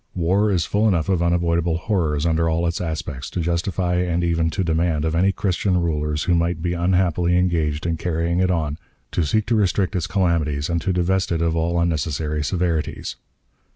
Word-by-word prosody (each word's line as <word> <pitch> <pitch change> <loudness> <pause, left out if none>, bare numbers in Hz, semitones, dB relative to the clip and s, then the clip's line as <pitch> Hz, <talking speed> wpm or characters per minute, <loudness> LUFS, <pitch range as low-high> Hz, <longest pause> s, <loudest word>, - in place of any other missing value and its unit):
War 95 +5 +2
is 90 -5 +1
full 105 +2 +1
enough 85 -6 +1
of 90 -3 +2
unavoidable 85 -1 +1
horrors 85 -6 -1
under 80 0 +2
all 80 +1 0
its 85 +1 -1
aspects, 80 -5 -4
to - - -4
justify 90 +1 0
and 90 -1 0
even 85 -1 +1
to 95 +3 -2
demand 80 -2 0
of 80 - 0
any 90 +4 +3
Christian 95 -1 0
rulers 75 -3 -1
who 90 - +1
may 85 0 +2
be 85 +1 -3
unhappily 90 0 +1
engaged 80 -4 0
in 85 -1 0
carrying 85 +1 -1
it 95 0 +2
on, 80 -4 -1 0.3
to 85 - 0
seek 105 +8 +1
to 120 - +1
restrict 100 -1 +1
its 85 -3 -1
calamities 80 -6 0
and 85 0 0
to 95 - -1
divest 90 +1 0
it 85 -1 0
of 85 -1 +1
all 85 +1 0
unnecessary 75 -2 -1
severities. 85 -1 -2
85 Hz, 190 wpm, -22 LUFS, 80-90 Hz, 0.3 s, any